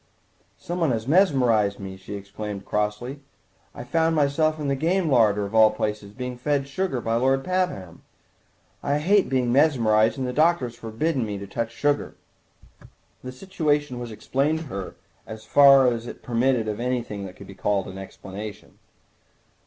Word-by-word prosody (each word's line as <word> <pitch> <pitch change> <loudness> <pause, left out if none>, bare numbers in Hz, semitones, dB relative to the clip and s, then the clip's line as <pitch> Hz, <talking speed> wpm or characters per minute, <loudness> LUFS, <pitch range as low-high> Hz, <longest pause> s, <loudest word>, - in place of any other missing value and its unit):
"Some 175 +1 -5
one 165 -3 +2
has 110 +1 -3
mesmerised 130 - +3
me," 95 -1 -7
she 95 +2 -8
exclaimed 100 0 -7
crossly; 105 +6 -2 0.6
"I - - -7
found 160 +6 +1
myself 155 +2 +1
in 150 - -3
the 140 - +1
game 165 +3 0
larder, 105 -5 +3
of 100 - -8
all 110 -1 +7
places, 105 -1 -4
being 125 +2 -6
fed 145 +2 +1
with 140 0 -12
sugar 185 -5 -1
by 115 0 0
Lord 135 +2 +2
Pabham. 180 - -2 0.8
I 140 +1 0
hate 195 +6 +2
being 130 -2 +1
mesmerised, 115 -7 +3
and 130 - -2
the 125 - -3
doctor 160 -1 +3
has 120 -1 -8
forbidden 120 +5 -2
me 105 -2 -4
to 100 - -7
touch 115 +3 -3
sugar." 145 +4 -1 1.1
The 130 - -6
situation 145 -3 -1
was 120 -1 -6
explained 135 +8 -1
to - - -7
her, 100 -8 -6 0.3
as 110 0 -9
far 135 +2 +7
as 120 -1 0
it - - -9
permitted 120 -1 +1
of 105 0 -3
anything 120 -4 -3
that 90 - -12
could 100 - -12
be 100 - -11
called 100 0 -1
explanation. 95 +2 -9
125 Hz, 170 wpm, -24 LUFS, 105-145 Hz, 1.1 s, all